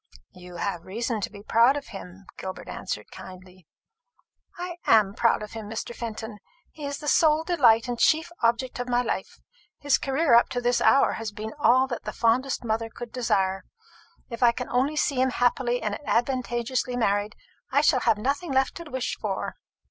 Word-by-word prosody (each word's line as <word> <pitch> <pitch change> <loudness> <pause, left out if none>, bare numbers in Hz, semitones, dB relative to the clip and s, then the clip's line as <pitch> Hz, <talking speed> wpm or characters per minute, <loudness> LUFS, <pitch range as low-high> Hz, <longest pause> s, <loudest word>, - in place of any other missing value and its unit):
"You 180 -1 -12
have 175 -2 -3
reason 225 +3 -3
to - - -2
be 200 - -12
proud 235 +6 +4
of 285 - -7
him," 195 -1 -10
Gilbert 185 0 -7
answered - - -5
kindly. 185 -2 -12 0.9
"I 350 0 -5
am 210 -3 +5
proud 230 0 +2
of 210 - -8
him, 220 -2 -7
Mr. 225 +2 -5
Fenton. 220 -2 -6 0.3
He 300 -2 -8
is 280 0 -4
the 295 - -8
sole 310 +1 +4
delight 255 -10 +4
and 240 -1 -3
chief 325 +2 +3
object 235 +2 0
of 245 0 -4
my 245 0 +2
life. 230 - -4 0.4
His 285 -1 +2
career 285 0 +1
up 235 - +6
to 245 - -2
this 245 0 +1
hour 275 - +5
has 225 -2 -4
been 215 +1 -6
all 255 0 +5
that 250 -3 -5
the - - -5
fondest 250 +4 +1
mother 225 0 -1
could 240 0 -9
desire. 195 -6 0 0.6
If 235 -2 -8
I 240 -1 +6
can 250 +1 -6
only 265 +5 +1
see 280 -3 +1
him 260 - +3
happily 245 0 0
and 210 -1 -2
advantageously 245 0 -1
married, 205 -1 0 0.4
I - - +4
shall - - +4
have 215 - +2
nothing 280 +8 -2
left 265 0 +2
to 340 -2 -9
wish 260 -3 -3
for." - - -3
240 Hz, 185 wpm, -26 LUFS, 215-265 Hz, 0.9 s, up